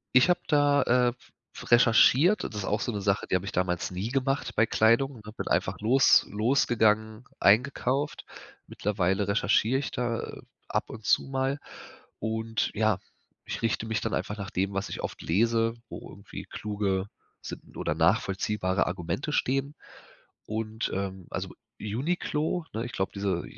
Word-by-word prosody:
Ich 130 +7 +6
habe 175 - +3
da, 145 -2 +4
äh, 125 -1 +3 0.5
recherchiert, 125 - +5
das 105 - -5
ist 105 - -3
auch 105 - 0
so 120 - -1
'ne 105 - -4
Sache, 100 0 +1
die - - +1
habe 95 +1 -1
ich - - -4
damals 90 -1 -1
nie 95 +5 -3
gemacht 135 +1 -1
bei 115 - +4
Kleidung 115 +5 +3
und 110 -3 -14
hab 105 +1 -10
bin - - -4
einfach - - 0
los 125 +6 +5
losgegangen, 110 -1 +2 0.2
eingekauft. 130 +6 +2 0.4
Mittlerweile 95 -1 0
recherchiere 110 +4 +2
ich 140 - -3
da, 120 -2 -2
äh, - - -8 0.3
ab - - -2
und 110 -1 -9
zu - - +4
mal 135 +1 -1 0.6
und 110 0 -2
ja, 110 -2 +2 0.5
ich - - -5
richte 115 -1 0
mich 110 0 -1
dann 115 - -2
einfach 105 - -2
nach 100 0 -6
dem, 95 +2 -1
was 100 0 -2
ich - - -5
oft - - -5
lese, 115 +5 +2
wo - - -9
irgendwie - - -9
kluge 100 -2 -2 0.3
sinn - - -9
oder - - -1
nachvollziehbare 95 -1 +1
Argumente 95 - -3
stehen, 135 +1 0 0.7
und, 110 +1 -3
ähm, 95 -2 -4
also - - -4 0.3
„Uniqlo“, 150 - -1
ne? 115 +2 -3
Ich 120 - -6
glaub 95 - -1
diese 100 -4 -1
110 Hz, 165 wpm, -28 LUFS, 100-130 Hz, 0.7 s, Ich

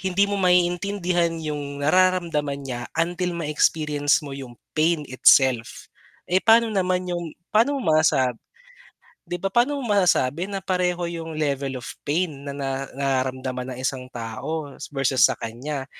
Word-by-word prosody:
hindi 190 +1 +2
mo 200 0 -2
maiintindihan 180 0 +2
yung 145 -2 -4
nararamdaman 165 -5 +2
niya 120 -2 -5
until 175 +1 -1
ma-experience 150 -1 +1
mo 140 - -7
yung 130 -3 -8 0.2
pain 155 0 +2
itself. 130 -2 +3 0.4
Eh, 185 +1 +4
pano 225 0 +5
naman 185 -2 0
yung 175 -3 -4 0.2
pano 255 +7 +3
mo 160 -3 +2
sasab 130 -5 +2 1.0
'di 175 - -2
ba 195 - -3
paano 265 +6 +2
mo 260 - -4
masasabi 180 -2 +2
na 200 - -2
pareho 180 -2 0
yung 165 -2 -6
level 140 -3 -1
of 120 - -10 0.2
pain 150 -2 -1
na 140 - -6
na 135 -1 -3
nararamdaman 130 -1 -2
ng - - -10
isang 130 -1 -3
tao, 120 +7 -5 0.2
versus 135 -2 +1
sa 130 - +5
kanya. 130 +5 -5
155 Hz, 145 wpm, -23 LUFS, 135-180 Hz, 1.0 s, pano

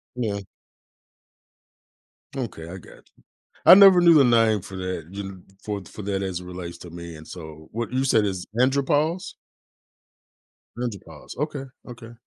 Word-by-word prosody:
Yeah. 105 -5 -2 1.9
Okay, 80 0 -5
I 95 - -7
gotcha. 90 - -15 0.6
I 180 - +11
never 195 -2 +8
knew 170 -1 +7
the 140 -3 +7
name 115 -4 +3
for 95 - -9
that, 90 -3 -5
you 100 +1 -5
kn 95 -2 -10 0.2
for 105 -2 -4
for 105 - -10
that 100 0 -2
as 90 -2 -3
it - - -10
relates 90 -1 -8
to 85 - -11
me, 85 -1 -9
and 80 - -13
so 80 -3 -10
what 120 +2 -4
you 130 +1 0
said 115 -5 +3
it's 95 -3 -3
andropause? 145 +6 +1 1.4
Andropause, 100 -11 -7
okay, 145 -1 -3 0.2
okay. 120 -1 -11
100 Hz, 150 wpm, -24 LUFS, 90-130 Hz, 1.9 s, I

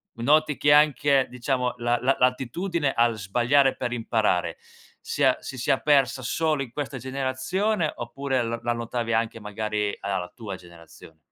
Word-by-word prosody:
noti 150 +5 +2
che 145 0 +4
anche, 145 -2 +4
diciamo, 125 0 -1
la 120 0 +1
la 135 +2 +2
l'attitudine 135 +5 0
al 115 -1 +2
sbagliare 125 +7 +2
per 125 -1 -3
imparare 105 -8 0 0.4
sia - - +1
si 130 - -8
sia 130 +2 +1
persa 135 -3 +2
solo 155 +2 0
in 120 - -11
questa 145 -2 -4
generazione, 140 - -1
oppure 130 +1 -2
l 115 0 -3
la 120 0 +1
notavi 115 0 -3
anche 115 0 0
magari 105 0 -2
alla 100 -1 -1
la 90 0 -5
tua 105 -5 -6
generazion 85 -2 -15
125 Hz, 155 wpm, -25 LUFS, 115-140 Hz, 0.4 s, che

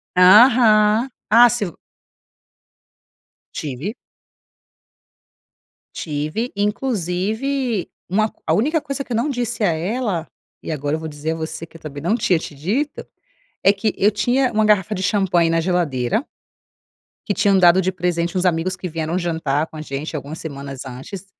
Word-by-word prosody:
Aham. 215 +3 +6 0.2
Ah, 240 +3 +7
se 240 -2 -1
eu 175 - -8 1.8
Tive. 150 - -4 2.0
Tive. 155 - -3
Inclusive 215 +3 -1 0.2
uma 215 +4 +1 0.2
a - - +3
única 300 +8 +1
coisa 275 -2 -4
que 250 - -6
eu - - 0
não 255 +6 0
disse 240 -3 -2
a 190 - +3
ela, 180 +1 -2 0.3
e - - -5
agora 145 0 -1
eu - - -4
vou 160 - -5
dizer 150 +1 -4
a - - -5
você 160 0 -5
que 165 - -15
eu - - -23
também 145 -2 -7
não 205 +7 +2
tinha 195 -6 +2
te 160 - -8
dito, 240 - -2 0.6
é 195 - +6
que 205 +1 -1
eu 200 - +4
tinha 245 +5 +1
uma 215 0 +2
garrafa 210 -1 +2
de 190 - -3
champanhe 185 -5 +2
na 165 0 +2
geladeira, 165 - 0 1.0
que 205 - -1
tinham 195 -1 +3
dado 180 0 +6
de 185 - 0
presente 175 0 -1
uns 180 - +1
amigos 180 +1 0
que 185 -1 -5
vieram 165 +2 -2
jantar 160 -4 -1
com - - -13
a 155 - -6
gente 150 +2 -5
algumas 145 +3 -7
semanas 140 -3 -7
antes, 135 +10 -8
185 Hz, 160 wpm, -20 LUFS, 160-220 Hz, 2.0 s, Ah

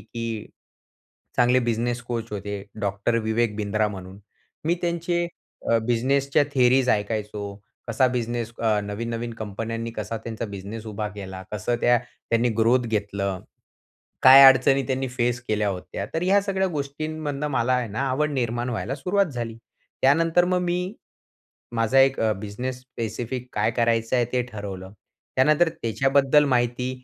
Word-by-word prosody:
की 115 +1 -5 0.9
चांगले 125 +1 +4
business 120 +1 -1
coach 115 -2 -4
होते, 100 0 -4 0.2
डॉक्टर 100 +3 0
विवेक 110 -1 0
बिंद्रा 105 0 0
म्हणून. 95 -1 -9 0.5
मी 170 +2 +2
त्यांचे 170 0 0 0.4
अ, 115 - +5
बिझनेसच्या 135 +4 +2
थियरीज 130 0 +4
ऐकायचो, 105 -1 -2 0.3
कसा 115 +3 +3
बिझनेस 115 -1 -2
अ, 110 -2 +2
नवीन-नवीन 115 +3 -4
कंपन्यांनी 115 +2 -4
कसा 105 +2 -3
त्यांचा 115 0 -4
बिझनेस 105 +4 -7
उभा 105 0 -3
केला? 95 -2 -7
कसं 105 +4 -1
त्या 120 0 +5 0.3
त्यांनी 115 +1 +3
ग्रोथ 120 +2 +3
घेतलं? 100 -3 -2 0.8
काय 135 +1 +10
अडचणी 135 +1 +6
त्यांनी 130 0 -1
फेस 120 -1 0
केल्या 105 -1 +1
होत्या? 95 +1 -5
तर 165 - -1
ह्या 195 +2 +4
सगळ्या 190 -1 0
गोष्टींमधनं 150 -1 -3
मला 130 -1 +1
आहे 125 -2 0
ना, 110 +6 -3
आवड 150 +3 0
निर्माण 120 -1 -1
व्हायला 125 +2 -3
सुरुवात 190 +7 +1
झाली. 115 -2 -4 0.5
त्यानंतर 165 +5 +4
मग 180 0 +1
मी 180 +3 -2 0.8
माझा 115 +4 +3
एक 135 0 +4
अ, 110 -1 +3
बिझनेस 125 +5 -5
स्पेसिफिक 120 0 -5
काय 115 - +1
करायचं 115 0 +1
आहे 120 - +3
ते 125 - +2
ठरवलं. 95 -3 -7 0.4
त्यानंतर 155 +5 +4
त्याच्याबद्दल 135 +5 +3
माहिती 125 -1 +1
120 Hz, 140 wpm, -24 LUFS, 110-135 Hz, 0.9 s, काय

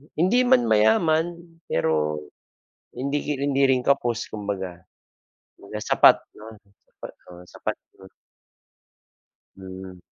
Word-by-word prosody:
hindi 190 +10 +3
man 125 - +5
mayaman, 160 +11 +2 0.3
pero 75 -2 0 0.7
hindi 140 +3 -2
ri 150 - -2
hindi 140 -1 +1
rin 130 -1 +2
kapos, 120 -4 0
kumbaga. 95 -4 -5 0.8
Kumbaga - - -8
sapat - - +6 0.2
'no, 110 +1 -11 0.3
sapat - - -11 0.2
o, 90 0 -13
sapat - - -4 0.2
'yon. 95 0 -15 1.5
Mhm. 95 -1 -10
110 Hz, 105 wpm, -24 LUFS, 95-140 Hz, 1.5 s, sapat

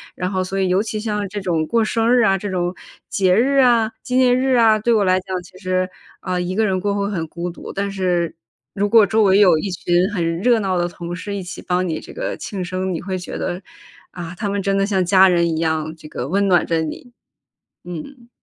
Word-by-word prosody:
然 185 +1 -3
后 185 -1 0
所 195 +1 -3
以 190 - +2
尤 185 +2 +2
其 215 0 -4
像 210 -2 -2
这 205 +1 -4
种 165 -4 -1
过 230 -1 +2
生 225 +1 +1
日 245 -1 +5
啊， 195 -2 +2
这 205 - -4
种 180 -1 -1 0.3
节 185 -2 +2
日 270 +6 +2
啊， 235 -4 +4
纪 250 - -4
念 255 -1 +4
日 260 0 +2
啊， 225 -2 +5
对 235 +3 +1
我 215 -3 +3
来 185 -1 +3
讲 185 0 -4
其 185 +1 -16
实， 185 -1 0 0.3
啊， 185 -1 -2
一 180 +1 -3
个 220 +1 +2
人 190 -2 0
过 200 +1 -1
会 200 0 -1
很 165 -5 -3
孤 175 +2 -5
独。 - - -9
但 200 0 -3
是 180 -3 -1 0.4
如 205 +1 0
果 225 -1 +7
周 220 +3 +1
围 195 -2 +5
有 180 -6 +5
一 200 - -3
群 175 +1 +1
很 165 -4 -1
热 235 +3 +3
闹 190 -3 -1
的 175 -1 +1
同 175 0 -7
事 200 +3 -5
一 195 - -4
起 180 - -8
帮 180 0 -1
你 160 -2 -2
这 - - -12
个 - - -3
庆 190 -3 -5
生， 185 +1 -3
你 165 - -4
会 185 +1 -3
觉 180 - -6
得， 180 +1 -3 0.5
啊， 175 -1 -7
他 215 - -2
们 200 0 -1
真 195 0 0
的 195 - +2
像 195 -2 +1
家 190 +1 +6
人 170 -2 +3
一 160 - -1
样， 160 -1 -1
这 155 - -12
个 125 -4 -5
温 200 +3 +1
暖 180 -2 +3
着 165 -1 0
你， 160 +10 -6 0.7
嗯。 235 - -9
190 Hz, 265 characters per minute, -20 LUFS, 175-210 Hz, 0.7 s, 果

